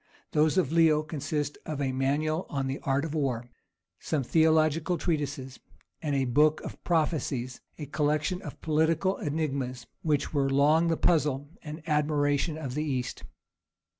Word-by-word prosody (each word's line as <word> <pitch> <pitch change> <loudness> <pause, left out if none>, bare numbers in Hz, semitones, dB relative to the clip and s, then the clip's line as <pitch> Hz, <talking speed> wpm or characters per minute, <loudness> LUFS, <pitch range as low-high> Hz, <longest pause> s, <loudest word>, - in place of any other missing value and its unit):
Those 155 +3 +3
of 155 -7 +2
Leo 160 -2 +4
consist 145 -1 -3
of 155 -2 -5
a 135 -2 0
manual 145 +6 0
on 135 -2 -2
the 135 +1 -3
Art 140 +2 0
of 155 - -5
War, 130 -6 -1 0.5
some 150 -4 -1
theological 160 +3 +3
treatises, 145 -5 -2 0.4
and 145 -3 -1
a 135 -1 +2
book 150 +5 +3
of - - -9
prophecies, 145 -7 -1 0.2
a 150 - -5
collection 150 +4 0
of 150 - -9
political 160 +4 +1
enigmas, 140 -5 -2 0.2
which 150 -2 0
were 140 -2 +2
long 150 +5 +4
the 165 -1 +1
puzzle 145 -3 +1
and 155 0 -8
admiration 150 0 +1
of 135 -5 -5
the 150 +3 -1
East. 130 -5 -3
150 Hz, 150 wpm, -28 LUFS, 140-155 Hz, 0.5 s, Leo